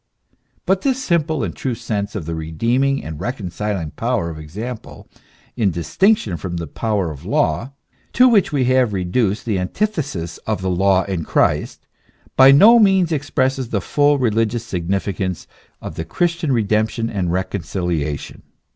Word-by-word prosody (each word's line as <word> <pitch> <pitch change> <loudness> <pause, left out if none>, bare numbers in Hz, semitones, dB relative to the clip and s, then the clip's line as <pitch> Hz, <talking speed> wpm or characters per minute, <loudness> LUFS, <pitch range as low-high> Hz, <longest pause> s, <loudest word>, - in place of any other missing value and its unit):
But 190 0 +2
this 265 -2 +1
simple 160 - 0
and 90 - -4
true 130 -3 -3
sense 100 -2 -4
of 95 -7 -4
the 85 - -4
redeeming 115 - 0
and 80 -1 -7
reconciling 100 - -3
power 115 -8 -1
of 80 - -8
example 110 +10 -8 0.5
in 110 -5 +2
distinction 95 - +1
from 85 -1 -5
the 85 - -4
power 100 +1 -2
of 70 -2 -10
law, 130 +6 0 0.4
to 250 +1 +6
which 220 -6 +3
we 140 -3 +1
have 130 -3 +2
reduced 95 +3 0
the 105 -5 0
antithesis 100 - -3
of 105 -3 -2
the 95 - 0
law 95 +1 +3
and 95 -4 -3
Christ, - - 0 0.5
by 130 0 +8
no 215 +12 +8
means 190 -5 +4
expresses 135 -4 -1
the 105 - 0
full 145 +8 +2
religious 115 -2 0
significance 95 -1 -2 0.4
of - - -6
the 80 - -4
Christian 170 - -1
redemption 110 0 0
and 95 -6 -2
reconciliation. 85 -5 -3
110 Hz, 150 wpm, -20 LUFS, 90-135 Hz, 0.5 s, by